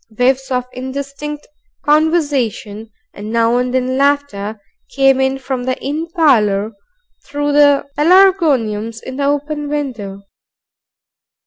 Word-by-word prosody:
Whiffs 255 +4 0
of 250 -1 -1
indistinct 280 +3 -6 0.4
conversation, 285 -9 0 0.2
and 210 +2 -7
now 230 +1 +2
and 250 0 -1
then 255 0 0
laughter, 275 -7 0 0.4
came 270 -1 +4
in 265 0 +1
from 260 -2 -4
the 255 0 -2
inn 305 +4 -3
parlor 215 - +3 0.5
through 290 0 -2
the 285 -1 +4
pelargoniums 295 - +3
in 260 0 -7
the 280 - 0
open 290 +1 -2
window. 230 -10 -4
270 Hz, 115 wpm, -16 LUFS, 230-290 Hz, 0.5 s, came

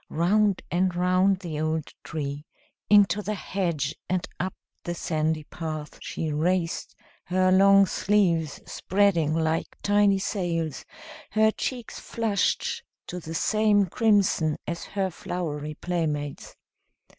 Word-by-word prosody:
Round 200 +4 +2
and 180 0 +1
round 185 +2 +2
the 160 -5 -4
old 155 0 -2
tree, 145 -1 -5 0.4
into 205 0 +5
the 210 +1 -3
hedge, 170 -7 -2 0.2
and 185 -1 0
up 185 0 -2 0.3
the 175 - -3
sandy 155 -2 -1
path 155 -1 -6
she 155 -2 -3
raced, 170 +2 -1 0.3
her 185 +1 +2
long 195 +1 +7
sleeves 180 -7 +1
spreading 180 -6 +1
like 160 0 -1
tiny 205 -1 +4
sails, 170 - -2 0.5
her 220 +1 +4
cheeks 245 +1 -4
flushed 220 -4 -1 0.2
to 180 - -6
the 165 -1 -7
same 210 +1 +3
crimson 195 -6 +2
as 170 0 -4
her 195 -2 -2
flowery 155 -4 -4
playmates. 150 -5 -3
180 Hz, 120 wpm, -26 LUFS, 160-200 Hz, 0.5 s, long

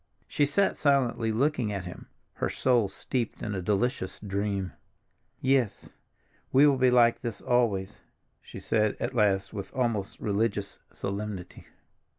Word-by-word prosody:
She 145 - +1
sat 195 +7 +1
silently 130 -6 +2
looking 125 -2 +1
at 100 -3 -4
him, 90 - -9 0.3
her - - -2
soul 120 -6 +2
steeped 120 +3 -3
in 105 - -3
a 95 - -2
delicious 105 +2 -1
dream. 100 -2 -2 0.7
"Yes, 130 -6 +1 0.6
we 140 +3 +6
will 140 -3 +4
be 130 0 +5
like 120 -1 +5
this 115 -3 -5
always," 105 -5 0 0.4
she - - -10
said 110 -1 +1
at 125 - -2
last 100 -4 +2
with 100 -2 -6
almost 115 -6 -1
religious 100 -1 -1
solemnity. 100 -2 -5
110 Hz, 140 wpm, -28 LUFS, 100-125 Hz, 0.7 s, we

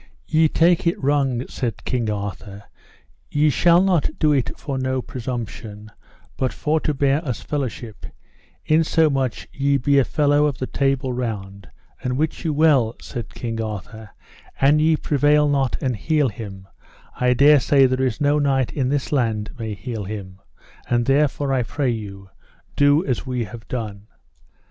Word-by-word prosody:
Ye 160 0 +3
take 170 +2 +2
it 170 - +1
wrong, 135 -3 0
said 115 -6 -4
King 120 -4 -1
Arthur, 100 -1 -5 0.7
ye 150 +1 +2
shall 175 +4 +4
not 185 -6 +2
do 155 - +3
it 135 -4 -1
for 135 -3 -4
no 130 0 -1
presumption, 115 -4 -6 0.5
but 130 -1 0
for 155 +1 0
to 150 - -1
bear 140 +3 +1
us 125 - -4
fellowship, 125 -6 -5 0.6
insomuch 155 -5 +1
ye 140 0 +1
be 140 +2 +3
a - - +4
fellow 145 +2 +2
of 140 -3 -3
the 130 - -3
Table 135 -1 0
Round; 100 -5 -5 0.3
and 125 0 -2
wit 155 +2 -2
you 160 - 0
well, 145 -7 +3
said 120 -3 -7
King 115 -2 -4
Arthur, 110 0 -7 0.5
an 145 +3 +4
ye 160 +1 +3
prevail 150 0 +2
not 140 -3 +1
and 130 -2 0
heal 150 +5 +1
him, 100 -4 -9 0.5
I 125 0 +3
dare 145 +3 +6
say 135 +1 +4
there 130 0 0
is 125 -4 -1
no 145 +1 +2
knight 135 -3 +1
in 130 -3 -1
this 140 0 -1
land 115 -6 0
may 110 -2 -4
heal 105 +1 -5
him, 95 -2 -7 0.5
and 120 -1 +2
therefore 140 0 +1
I 130 - +2
pray 135 +2 -1
you, 100 -4 -7 0.4
do 145 +4 +4
as 130 0 -2
we 125 -2 -1
have 110 +2 -10
done. 105 -4 -5
130 Hz, 165 wpm, -22 LUFS, 115-145 Hz, 0.7 s, dare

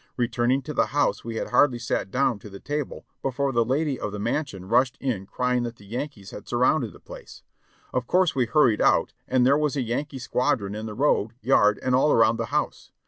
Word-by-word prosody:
Returning 125 +2 +1
to 150 - -6
the - - +2
house 145 - +1
we 115 0 -5
had - - -3
hardly 130 -4 +4
sat 95 - -2
down 125 -1 +1
to 105 - -11
the 100 0 -10
table 145 -1 -4 0.2
be - - +1
fore 135 +2 -1
the 120 -2 +2
lady 135 +3 -1
of 105 - -3
the 105 - -5
mansion 105 -3 -3
rushed 125 +3 +2
in 110 -8 -3
crying 125 +2 0
that 120 -1 -4
the 100 - -17
Yankees 115 -2 -6
had 105 - -10
surrounded 125 +6 +1
the - - -16
place. - - -12 0.5
Of - - -1
course 180 -2 +3
we 125 -3 +1
hurried 115 -3 +3
out, - - +3
and 125 -1 +2
there 140 +3 +4
was 150 -1 0
a 135 - 0
Yankee 135 +5 -3
squadron 125 -5 -1
in 110 +1 -5
the 105 - -7
road, 120 -5 +1
yard, 105 -5 +3
and 130 - 0
all 135 +4 +4
around 115 0 +4
the - - -3
house. - - -2
125 Hz, 225 wpm, -25 LUFS, 110-140 Hz, 0.5 s, hardly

